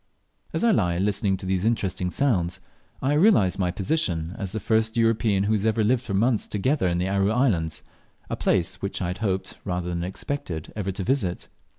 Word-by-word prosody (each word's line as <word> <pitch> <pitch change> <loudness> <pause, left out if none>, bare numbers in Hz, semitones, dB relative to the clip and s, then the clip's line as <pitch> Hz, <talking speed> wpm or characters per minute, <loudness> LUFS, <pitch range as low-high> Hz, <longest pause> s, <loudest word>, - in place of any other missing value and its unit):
As - - -1
I 235 - +5
lie 90 - +2
listening 100 0 +1
to 95 - -8
these 95 0 0
interesting 95 -5 0
sounds, 90 -6 +1 0.4
I 135 +2 +2
realize 150 - +4
my 90 -2 +1
position 90 - -1
as 100 -4 -3
the 110 - -2
first 110 +2 +1
European 115 -3 +2
who 105 +2 +1
has 105 -2 0
ever 110 0 +2
lived 120 +3 +2
for 100 -6 -4
months 115 +2 +2
together 120 +1 0
in 85 -1 0
the 90 +1 0
Aru 100 +1 +2
islands, 105 - +1 0.4
a - - -2
place 90 -2 0
which 100 - -3
I 90 - -2
had 90 - -4
hoped 95 -3 -2
rather 90 -2 -2
than 85 -1 -2
expected 90 - -5
ever 100 -2 -2
to 95 +1 -4
visit. 100 -7 -1
100 Hz, 200 wpm, -25 LUFS, 90-115 Hz, 0.4 s, I